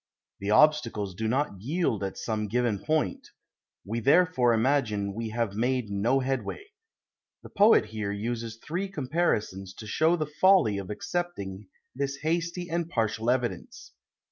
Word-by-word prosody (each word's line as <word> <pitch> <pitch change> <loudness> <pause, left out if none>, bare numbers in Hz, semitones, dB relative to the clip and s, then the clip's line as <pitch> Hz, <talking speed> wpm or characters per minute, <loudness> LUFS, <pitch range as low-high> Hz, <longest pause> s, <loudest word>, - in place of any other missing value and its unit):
The 100 - -4
obstacles 115 -6 +3
do 110 +5 -3
not 125 -5 -1
yield 130 - -1
at 95 - -4
some 110 -2 -2
given 115 -1 0
point; 155 +7 -1 0.6
we 115 +4 -2
therefore 140 -1 +4
imagine 110 -5 +1
we 115 +1 -4
have 115 -2 -2
made 125 -1 0
no 115 +7 +1
headway. 135 - -3 0.8
The - - -12
poet 210 - +5
here 105 -2 -4
uses 115 +2 -4
three 175 +10 -4
comparisons 125 - -1
to 110 - -9
show 160 +10 +2
the 155 -3 -1
folly 150 - +3
of 95 - -7
accepting 105 - -4 0.3
this 140 +1 -3
hasty 170 +2 -1
and 170 0 -2
partial 115 -3 -1
evidence. 125 -1 -2
120 Hz, 145 wpm, -27 LUFS, 105-155 Hz, 0.8 s, poet